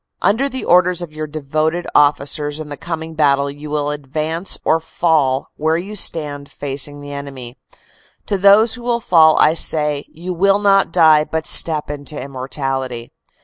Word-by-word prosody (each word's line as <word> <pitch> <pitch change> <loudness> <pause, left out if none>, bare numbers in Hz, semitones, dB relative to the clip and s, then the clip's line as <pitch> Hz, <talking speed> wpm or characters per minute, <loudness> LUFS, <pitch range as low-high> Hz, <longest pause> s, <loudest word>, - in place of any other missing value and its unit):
"Under 255 +7 +2
the 260 0 -5
.orders 180 0 +3
of 160 -3 -9
your 155 0 -5
devoted 155 +3 -2
officers 145 +1 +1
in 155 -1 -7
the 145 - -6
coming 160 +1 -6
battle 140 -2 +1
you 145 +1 -10
will 145 0 -1
advance 155 +5 -2
or 160 - +3
fall 155 -5 0
where 160 +2 0
you 195 +5 -6
stand 145 -6 -1
facing 145 +1 -5
the 145 0 -8
enemy. 135 -4 -8 0.7
To 200 -2 -2
those 205 +4 +5
who 245 - -6
will 235 0 -1
fall 160 -7 +4
I 155 - +5
say, 150 -3 +1
You 175 +3 -7
will 195 +3 +3
not 200 -1 +2
die 155 -3 +5
but 160 0 -4
step 155 -3 +2
into 145 +1 -6
immortality. 135 -2 -5
155 Hz, 165 wpm, -17 LUFS, 145-175 Hz, 0.7 s, those